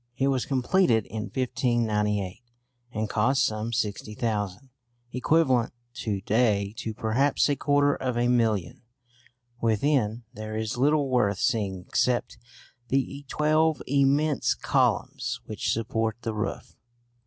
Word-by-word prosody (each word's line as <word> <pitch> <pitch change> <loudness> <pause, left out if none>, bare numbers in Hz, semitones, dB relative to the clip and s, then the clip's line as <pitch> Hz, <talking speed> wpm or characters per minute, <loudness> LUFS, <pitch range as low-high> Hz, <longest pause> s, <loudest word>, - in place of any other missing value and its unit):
It 135 +1 +2
was 130 -2 0
completed 130 - +2
in 110 -1 -5
1598 110 -6 -1 0.5
and 110 -2 -2
cost 120 +6 +2
some 110 +1 -2
£60,000, 110 0 -3 0.4
equivalent 130 -3 +2 0.2
to 105 -7 -3
day 105 -2 +1
to 110 -1 -4
perhaps 125 +7 +2
a 145 - +1
quarter 145 0 +2
of 125 -2 -2
a 120 0 +2
million. 115 -6 +1 0.8
Within, 115 0 +1
there 110 -1 -5
is 110 -1 -2
little 145 +3 +2
worth 115 -6 +2
seeing 95 -4 -1
except 125 -1 0 0.5
the 135 +2 -1
twelve 155 +1 +2
immense 140 +2 +2
columns 120 -2 0
which 110 -2 -2
support 110 -1 -1
the 115 - -2
roof. 105 -1 -4
120 Hz, 120 wpm, -26 LUFS, 110-135 Hz, 0.8 s, It